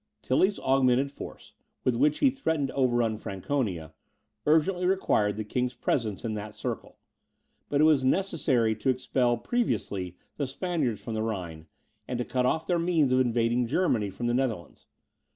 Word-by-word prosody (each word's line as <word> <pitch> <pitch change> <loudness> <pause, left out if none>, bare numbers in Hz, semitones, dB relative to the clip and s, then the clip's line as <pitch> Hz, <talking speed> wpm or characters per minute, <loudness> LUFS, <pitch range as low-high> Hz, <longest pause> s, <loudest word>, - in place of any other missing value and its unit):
Tilly's 190 +10 +2
augmented 130 0 +2
force, - - -10 0.3
with 130 - +2
which 145 +5 +3
he 265 - +6
threatened 160 - -1
to - - -7
overrun 120 -4 +1
Franconia, 95 - -3 0.5
urgently 175 +4 +3
required 105 - +1
the 110 - -2
king's 125 +4 -2
presence 115 -4 -1
in 110 - -1
that 105 0 -6
circle; - - -5 0.7
but 145 0 +2
it - - +6
was 155 -4 +5
necessary 130 - +2
to 130 - -1
expel 125 -1 +1
previously 95 - -2 0.2
the 140 - -1
Spaniards 145 - -2
from 115 - -5
the 110 - -1
Rhine, 90 -8 -4 0.4
and 125 - -2
to 120 - -2
cut 125 -1 0
off 160 +5 0
their 175 -2 +1
means 165 -6 +2
of 130 - +4
invading 120 -1 +2
Germany 120 - +1
from 100 +5 -5
the 120 - +1
Netherlands. 120 -9 -2
125 Hz, 165 wpm, -28 LUFS, 110-150 Hz, 0.7 s, he